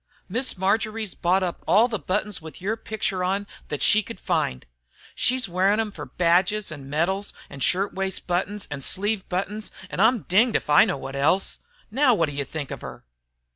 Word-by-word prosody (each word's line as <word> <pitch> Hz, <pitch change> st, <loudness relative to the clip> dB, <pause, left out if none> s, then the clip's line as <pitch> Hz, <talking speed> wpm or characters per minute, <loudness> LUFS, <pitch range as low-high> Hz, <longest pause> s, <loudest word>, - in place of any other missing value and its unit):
Miss 235 Hz, +3 st, 0 dB
Marjory's 215 Hz, +2 st, 0 dB
bought 185 Hz, +2 st, +2 dB, 0.2 s
all 220 Hz, +5 st, +5 dB
the 220 Hz, -4 st, -3 dB
buttons 195 Hz, +4 st, -2 dB
with 160 Hz, 0 st, -9 dB
yer 200 Hz, +4 st, -1 dB
picture 210 Hz, -4 st, -2 dB
on 195 Hz, +2 st, 0 dB, 0.2 s
thet 145 Hz, -, -1 dB
she 215 Hz, -, +6 dB
could 230 Hz, +2 st, -9 dB
find. 155 Hz, -, -1 dB, 0.5 s
She's 250 Hz, -2 st, +1 dB
wearin' 190 Hz, +4 st, +2 dB
'em 220 Hz, -1 st, -1 dB
fer 150 Hz, -6 st, -8 dB
badges 180 Hz, +7 st, +1 dB
an' 140 Hz, -3 st, -9 dB
medals, 190 Hz, +7 st, 0 dB, 0.2 s
an' 140 Hz, -, -9 dB
shirt 190 Hz, +8 st, +1 dB
waist 190 Hz, -1 st, -2 dB
buttons, 190 Hz, +3 st, -2 dB
an' 140 Hz, -2 st, -4 dB
sleeve 205 Hz, +6 st, -1 dB
buttons, 200 Hz, +4 st, -2 dB, 0.2 s
an' -, -, -4 dB
I'm 225 Hz, +2 st, +4 dB
dinged 220 Hz, +6 st, +3 dB
if -, -, 0 dB
I 145 Hz, -, +8 dB
know -, -, -1 dB
what 135 Hz, 0 st, -7 dB
else. 160 Hz, +8 st, +2 dB, 0.3 s
Now 260 Hz, 0 st, +4 dB
wot 165 Hz, -6 st, +1 dB
do -, -, -7 dB
you 140 Hz, 0 st, -2 dB
think 145 Hz, 0 st, -6 dB
of -, -, -6 dB
her?" -, -, -9 dB
190 Hz, 190 wpm, -24 LUFS, 165-215 Hz, 0.5 s, I